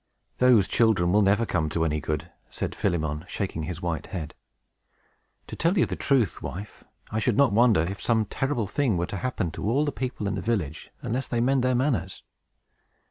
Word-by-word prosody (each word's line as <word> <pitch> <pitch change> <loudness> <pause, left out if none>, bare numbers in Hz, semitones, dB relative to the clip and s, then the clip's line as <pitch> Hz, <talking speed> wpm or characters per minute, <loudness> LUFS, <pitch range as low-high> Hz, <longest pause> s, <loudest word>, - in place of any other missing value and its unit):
"Those 125 -6 +5
children 105 -7 +3
will 105 +2 +4
never 105 +3 +3
come 80 -7 0
to 80 +1 0
any 75 -1 -1
good," 75 0 -3 0.2
said - - -4
Philemon, 75 -2 -1
shaking 95 -5 -3
his 85 +2 -5
white 85 -2 -2
head. 80 -6 -5 1.1
"To - - -8
tell 170 +4 +1
you 175 - +5
the - - -4
truth, 130 - +1
wife, 100 +3 -7 0.3
I 110 - 0
should 110 0 +1
not 140 -6 +4
wonder 115 -5 +5
if 95 +4 -3
some 110 -2 +2
terrible 130 +1 -1
thing 115 -1 0
were 85 - 0
to 100 - -5
happen 110 -8 -2
to 100 - -3
all 140 +6 +2
the 145 - -1
people 130 -5 -4
in 100 - 0
the 100 - -3
village 95 -9 -2
unless 130 +4 -2
they 120 - -1
mend 130 +2 +2
their 130 0 +2
manners. 120 - -1
105 Hz, 195 wpm, -26 LUFS, 85-125 Hz, 1.1 s, Those